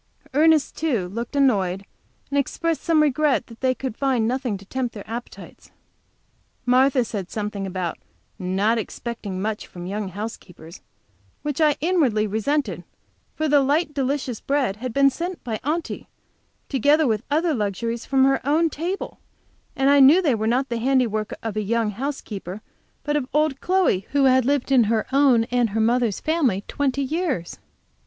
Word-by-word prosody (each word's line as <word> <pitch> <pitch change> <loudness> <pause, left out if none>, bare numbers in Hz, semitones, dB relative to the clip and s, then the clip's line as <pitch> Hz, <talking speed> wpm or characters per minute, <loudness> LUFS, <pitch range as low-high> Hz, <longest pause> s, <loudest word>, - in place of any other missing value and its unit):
Ernest, 310 +1 +3
too, 245 - -1
looked 230 +7 -5
annoyed, 200 -9 +2 0.5
and 285 - +2
expressed 330 +4 -1
some 320 -2 +3
regret 295 -3 +2
that 230 -1 -15
they 260 -1 +2
could 260 -4 -5
find 255 -5 +1
nothing 250 -4 -1
to 200 - -15
tempt 245 +2 -3
their 205 - -9
appetites. 235 +2 -9 1.0
Martha 255 0 +4
said 195 -5 -5
something 205 -2 -4
about 180 -2 -4 0.4
not 195 +5 +1
expecting 220 -3 -5
much 210 +2 -3
from 175 -1 -9
young 200 +2 -3
housekeepers, 185 -4 -8 0.6
which 295 +1 -2
I 300 -2 +4
inwardly 290 - +2
resented, 215 - -1 0.5
for 315 - -1
the 290 -1 +5
light, 295 +3 +1
delicious 270 -3 -2
bread 270 -8 0
had 255 +2 -4
been 275 +3 +4
sent 345 +5 -5
by 225 -4 -3
Aunty, 315 +5 -3 0.6
together 290 +4 +3
with 220 -4 +1
other 320 +3 +1
luxuries 230 +1 -2
from 265 -1 +2
her 270 0 +3
own 315 +4 +2
table, 350 +7 -4 0.6
and 270 +1 +3
I 285 - +6
knew 280 +6 +8
they 310 -8 +2
were 220 -1 -1
not 255 +4 +1
the 235 -1 -2
handiwork 230 -4 +1
of 225 -2 -3
a 215 - 0
young 225 +1 0
housekeeper, 210 -5 -5 0.4
but 295 0 -1
of 280 -4 -1
old 300 -3 +1
Chloe, 365 - +1
who 285 -1 +3
had 260 -2 +4
lived 280 0 0
in 250 -4 +5
her 220 0 +1
own 270 -4 +4
and 245 -2 +2
her 215 +2 -2
mother's 230 -1 +1
family 275 - 0
twenty 280 -1 -1
years. 290 - -2
255 Hz, 165 wpm, -23 LUFS, 215-285 Hz, 1.0 s, knew